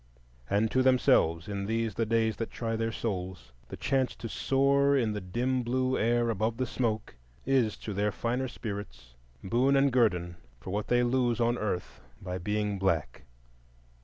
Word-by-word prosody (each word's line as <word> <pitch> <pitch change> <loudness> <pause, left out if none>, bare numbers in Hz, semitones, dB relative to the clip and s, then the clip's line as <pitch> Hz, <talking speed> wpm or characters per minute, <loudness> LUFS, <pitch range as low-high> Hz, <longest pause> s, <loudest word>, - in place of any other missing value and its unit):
And 105 +2 +1
to 130 - +3
themselves 110 -10 +3
in 100 -1 -3
these 115 -1 -1
the 115 +2 -1
days 110 -1 +1
that 115 - -3
try 115 -1 -3
their 115 0 -1
souls, 95 - -4 0.2
the - - -8
chance 135 -2 0
to 115 - -6
soar 140 +4 +2
in 115 -5 +1
the 105 - -4
dim 125 +8 -1
blue 130 +2 0
air 120 +1 +2
above 110 +2 -1
the 130 - 0
smoke 115 -3 -2 0.3
is 125 -5 +2
to 105 - -6
their 105 +2 0
finer 125 +5 -2
spirits 80 - -7 0.3
boon 125 +7 +2
and 135 -1 +3
guerdon 90 -8 +1 0.2
for 80 - -7
what 105 +1 -2
they 120 0 +3
lose 120 -1 +1
on 120 0 +2
earth 100 -6 -3 0.2
by 90 -1 -5
being 105 +1 -1
black. 80 -10 -1
115 Hz, 170 wpm, -29 LUFS, 100-125 Hz, 0.3 s, to